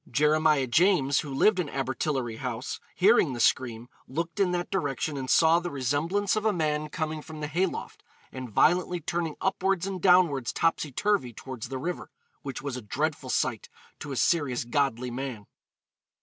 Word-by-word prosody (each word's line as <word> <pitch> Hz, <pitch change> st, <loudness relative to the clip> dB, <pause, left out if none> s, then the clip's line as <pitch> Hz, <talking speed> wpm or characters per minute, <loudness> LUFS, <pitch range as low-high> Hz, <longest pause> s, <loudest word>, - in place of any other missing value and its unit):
Jeremiah 150 Hz, -2 st, +3 dB
James, 145 Hz, 0 st, +3 dB
who 145 Hz, -, -5 dB
lived 185 Hz, +9 st, +3 dB
in 175 Hz, -, 0 dB
Abertillery 130 Hz, -2 st, -2 dB
House, 125 Hz, +1 st, -4 dB, 0.2 s
hearing 190 Hz, -, +4 dB
the 120 Hz, -, -5 dB
scream, 120 Hz, -1 st, +1 dB, 0.2 s
looked 165 Hz, +7 st, -4 dB
in 195 Hz, -2 st, +3 dB
that 175 Hz, 0 st, -2 dB
direction 145 Hz, -5 st, -1 dB
and 130 Hz, -2 st, -4 dB
saw 165 Hz, +1 st, +5 dB
the 175 Hz, 0 st, -4 dB
'resemblance 155 Hz, -, 0 dB
of 215 Hz, -, -1 dB
a 220 Hz, -, +3 dB
man' 155 Hz, -4 st, -1 dB
coming 155 Hz, 0 st, -3 dB
from 160 Hz, 0 st, -10 dB
the 150 Hz, -, -3 dB
hay 175 Hz, +6 st, +1 dB
loft -, -, -7 dB, 0.3 s
'and 130 Hz, -2 st, -7 dB
violently 175 Hz, -, +2 dB
turning 170 Hz, -1 st, -3 dB
upwards 190 Hz, -1 st, 0 dB
and 190 Hz, -2 st, -4 dB
downwards 175 Hz, -, +4 dB
topsy 165 Hz, -3 st, 0 dB
turvy' 195 Hz, -, 0 dB
towards 125 Hz, -1 st, -7 dB
the 135 Hz, -, -4 dB
river, 170 Hz, +7 st, -4 dB, 0.3 s
'which 135 Hz, -3 st, -6 dB
was 140 Hz, -3 st, -3 dB
a 125 Hz, -, -5 dB
dreadful 145 Hz, +4 st, -2 dB
sight 120 Hz, -3 st, -1 dB, 0.3 s
to 145 Hz, -, -7 dB
a -, -, -3 dB
serious 130 Hz, 0 st, +1 dB
godly 125 Hz, -2 st, 0 dB
man.' 125 Hz, -4 st, -5 dB
150 Hz, 175 wpm, -27 LUFS, 130-175 Hz, 0.3 s, saw